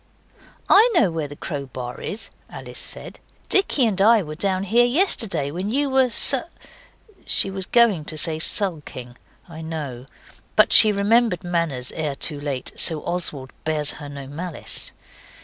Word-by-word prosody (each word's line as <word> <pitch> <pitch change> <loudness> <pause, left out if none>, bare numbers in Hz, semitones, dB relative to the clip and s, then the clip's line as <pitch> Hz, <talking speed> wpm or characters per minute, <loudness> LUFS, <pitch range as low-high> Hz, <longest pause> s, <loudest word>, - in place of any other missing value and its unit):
'I 435 +5 +5
know 195 - +2
where 160 -2 -4
the 145 - -11
crowbar 130 -5 -7
is,' 215 - -6 0.2
Alice - - -9
said. - - -8 0.3
'Dicky 345 -9 +2
and 200 -4 -1
I 220 0 +4
were 155 -2 -8
down 190 +3 -2
here 230 +5 +2
yesterday 235 - 0
when 185 +6 -5
you 280 +4 0
were 265 -1 +2
su - - +4 0.5
' - - -35 0.2
She 195 - +1
was 190 -1 -6
going 220 -10 +2
to 155 - -4
say 155 +1 +3
sulking, 150 -10 -1 0.3
I 160 -2 -11
know, 145 -6 -7 0.5
but - - +4
she 215 - +8
remembered 205 -1 +1
manners 170 -8 -3
ere 150 -3 -4
too 145 +1 -1
late 140 -3 -4
so 160 -2 +4
Oswald 150 -7 -2
bears 155 -2 +2
her 145 - -9
no 140 -1 -9
malice. 160 +4 +1
170 Hz, 160 wpm, -21 LUFS, 145-210 Hz, 0.5 s, she